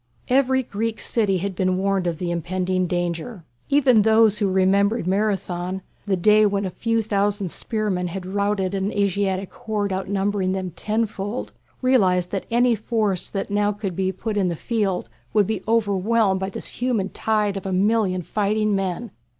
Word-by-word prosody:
Every 260 0 +3
Greek 225 0 -3
city 205 -5 0
had 195 +2 -3
been 185 0 0
warned 195 -1 0
of 170 -2 -1
the 175 0 -3
impending 185 +2 -1
danger. 175 +3 -3 0.3
Even 270 -6 +5
those 220 -1 +4
who 200 -3 +1
remembered 195 +2 +2
Marathon, 190 -2 -1 0.2
the 195 -2 +1
day 210 +4 +5
when 200 -1 +1
a 185 - -3
few 230 +3 0
thousand 205 -3 0
spearmen 210 -5 -1
had 180 +1 -5
routed 200 0 -1
an 195 +1 -1
Asiatic 195 -1 0
horde 210 -4 -2
outnumbering 195 0 -1
them 185 -2 -3
tenfold, 215 +3 -2 0.3
realized 185 -9 +3
that 195 - -3
any 240 +1 +3
force 215 -4 -1
that 195 0 -4
now 205 0 +2
could 200 -3 -4
be 190 +1 0
put 210 +3 -4
in 195 -2 +2
the 170 - -1
field 200 -2 -1 0.3
would 210 -2 +5
be 215 -1 -2
overwhelmed 210 -2 +2
by 190 0 -2
this 195 - -7
human 235 -6 0
tide 210 -2 0
of 195 0 -5
a - - -2
million 190 -1 +1
fighting 210 +2 0
men. 195 +3 -2
200 Hz, 165 wpm, -23 LUFS, 185-215 Hz, 0.3 s, Even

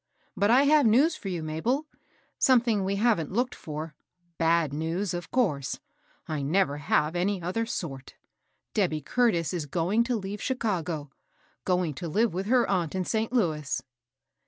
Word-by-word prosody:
But 200 +1 +2
I 255 +4 +6
have 290 -2 +5
news 280 +9 +4
fear 195 - -6
you, 170 -3 -3
Mabel, 225 - -1 0.3
— - - -38
something 235 -5 +3
we 195 +1 0
haven't 205 -7 +1
looked 245 +5 0
for, 155 0 -6 0.2
— 175 -1 -43
Ja(i 165 -2 +2
news, 165 +5 -2
of 175 0 -5
course, 155 - 0 0.2
— - - -36
I 155 -3 -2
never 145 0 +1
have 150 +2 +1
any 190 +2 0
other 185 +7 -2
sort. 135 - -5 0.6
Debby 170 -7 +1
Curtis 185 - +1
is 165 -5 -3
going 180 +9 +1
to 245 0 0
leave 200 -1 -5
Chicago, 175 - -2 0.3
— - - -36
going 180 -4 +1
to 170 +6 -6
live 220 +4 +1
with 190 +3 -3
her 245 0 +3
aunt 180 -4 0
in 185 -1 -1
St. 220 +3 -1
Louis." 160 - 0
185 Hz, 175 wpm, -27 LUFS, 160-225 Hz, 0.6 s, I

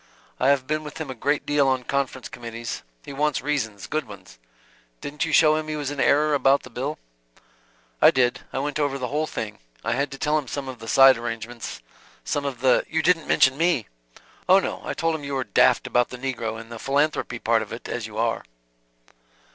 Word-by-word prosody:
I 130 - +2
have 140 -2 +3
been 155 +2 -1
with 150 -1 -8
him 155 -4 -5
a - - -4
great 145 +5 -1
deal 145 -1 +2
on 130 -1 +1
conference 135 -1 -2
committees. 115 -1 -6 0.2
He 140 - -7
wants 150 0 +1
reasons, 110 -10 -2
good 155 -4 -2
ones. 95 - -13 0.6
Didn't 150 +2 -3
you 165 - -3
show 155 0 +6
him 155 0 -2
he 155 - -3
was 145 -2 -3
in 145 - -6
error 150 +2 +3
about 140 0 +3
the 130 - -12
bill?" 135 +6 -3 1.0
"I - - +9
did. 125 -2 +2
I - - -4
went 145 +2 -2
over 145 -2 0
the 125 -2 -4
whole 155 +2 -1
thing. 110 -7 -5 0.2
I - - -1
had 140 +3 0
to 135 - -7
tell 150 +2 +1
him 140 - -8
some 140 +2 -4
of 130 -2 -7
the 115 - -9
side 135 +1 +7
arrangements, 115 0 -6 0.4
some 145 -1 -2
of 130 -4 -4
the 130 -1 +4
" - - -30
"You 160 0 0
didn't 165 -2 +2
mention 135 +2 +4
me?" 165 - +2 0.6
"Oh, 190 - +8
no. 195 - -2
I - - -4
told 165 -1 0
him 155 -2 -4
you 140 -1 -3
were 130 - 0
daft - - +3
about 120 0 +2
the 125 - -7
negro 120 -4 -3
and 115 0 -11
the 115 - -7
philanthropy 140 -2 0
part 115 -1 +2
of 110 - -7
it, 115 - -7
as 115 -3 -4
you 105 -1 -10
are." 115 0 0
135 Hz, 225 wpm, -24 LUFS, 120-150 Hz, 1.0 s, I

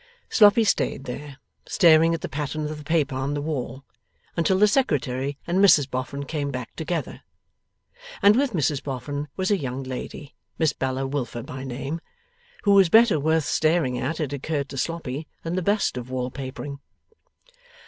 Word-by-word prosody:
Sloppy 210 +1 +6
stayed 200 -9 0
there, 140 +2 -7 0.3
staring 165 -2 +5
at 165 - -7
the - - -3
pattern 150 +1 -3
of 150 0 -5
the - - -10
paper 150 -2 +1
on 135 +2 -2
the - - -1
wall, 140 -3 -4 0.5
until 180 +3 +2
the 210 +2 +6
Secretary 140 - 0
and 175 +2 0
Mrs 170 -9 +6
Boffin 135 +2 -4
came 145 0 -3
back 125 -3 -6
together. 165 +1 -4 1.0
And 205 +1 +7
with 275 +1 +2
Mrs 150 -4 0
Boffin 145 +2 -4
was 190 +1 0
a 200 - +3
young 130 -1 -4
lady 130 +2 -7 0.2
(Miss 160 -3 +2
Bella 130 0 -2
Wilfer 135 -4 -3
by 130 0 -7
name) 135 +5 -4 0.6
who 200 - +3
was 195 -3 +6
better 225 -5 +6
worth 160 +1 +1
staring 155 -6 +1
at, 155 +7 -2
it 145 -3 -2
occurred 140 0 -2
to 135 - -7
Sloppy, 155 -2 -3 0.2
than 165 - -3
the 185 - 0
best 200 -2 +1
of 125 0 -6
wall 130 0 -3
papering. 140 +1 -6
145 Hz, 170 wpm, -24 LUFS, 135-165 Hz, 1.0 s, And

